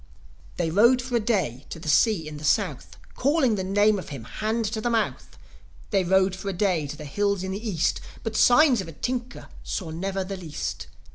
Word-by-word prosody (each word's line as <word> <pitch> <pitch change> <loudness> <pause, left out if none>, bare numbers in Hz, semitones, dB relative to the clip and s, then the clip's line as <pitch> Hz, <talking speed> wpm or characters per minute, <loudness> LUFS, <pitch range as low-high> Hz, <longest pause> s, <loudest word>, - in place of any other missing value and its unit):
They 165 -2 0
rode 235 +8 +5
for 250 0 -3
a - - +4
day 190 - -1
to - - -6
the 160 - -9
sea 170 0 +3
in 150 -1 -7
the 150 - -10
South, 150 - 0 0.2
Calling 275 -3 +2
the 195 -3 -1
name 205 +2 +3
of 180 - -8
him, 135 -5 -7
hand 220 - -2
to 220 - -2
the 240 - 0
mouth. 225 -2 -2 0.5
They 195 -2 +3
rode 190 +1 +3
for 195 +1 -5
a - - -2
day 175 -5 0
to 150 +1 -7
the 150 - -8
hills 200 +5 0
in 190 - -3
the 215 +4 -4
East, 175 -2 0 0.2
But 225 -1 -4
signs 250 -2 +5
of 185 - -8
a 165 - -9
tinker 245 - -4 0.2
saw 175 -6 -4
never 190 +4 -2
the 195 +1 -5
least. 160 -5 -5
195 Hz, 215 wpm, -25 LUFS, 170-225 Hz, 0.5 s, rode